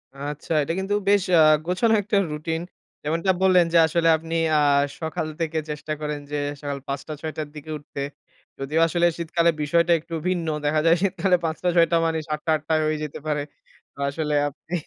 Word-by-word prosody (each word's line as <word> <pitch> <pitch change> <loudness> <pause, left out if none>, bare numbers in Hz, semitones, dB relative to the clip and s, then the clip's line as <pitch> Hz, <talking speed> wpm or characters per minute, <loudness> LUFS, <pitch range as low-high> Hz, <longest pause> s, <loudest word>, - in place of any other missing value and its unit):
আচ্ছা, 145 +3 -5
এটা 155 - -2
কিন্তু 195 +2 -2 0.2
বেশ 200 -2 +4 0.2
আ - - +7 0.2
গোছানো 185 +6 +2
একটা 205 +1 0
রুটিন। 160 +2 -3 0.4
যেমনটা 165 +5 +1
বললেন 185 -2 +5
যে - - +6
আসলে 165 +1 +1
আপনি 165 +1 -5 0.2
আ - - +4 0.4
সকাল 160 -1 -3
থেকে 165 -1 -2
চেষ্টা 150 +1 -4
করেন 150 -1 -3
যে, 150 - -1 0.2
সকাল 140 -1 -4
৫ঃ০০টা-৬ঃ০০টার 155 +2 -5
দিকে 150 +1 -8
উঠতে। 145 -1 -10 0.6
যদিও 140 +4 -1
আসলে 175 +1 +1
শীতকালে 170 0 +2
বিষয়টা 170 +3 +2
একটু 165 +2 -12
ভিন্ন। 175 -3 -1 0.2
দেখা 150 +1 +2
যায় 165 - +6
শীতকালে 190 -1 +2
৫ঃ০০টা-৬ঃ০০টা 170 +1 +2
মানে 165 0 0
৭ঃ০০টা - - -21
৮ঃ০০টায় 155 0 0
হয়ে 155 0 0
যেতে 150 - -6
পারে। 150 -1 0 0.7
আসলে 150 +1 -2 0.2
আপনি 160 +4 -14
160 Hz, 165 wpm, -24 LUFS, 150-170 Hz, 0.7 s, আ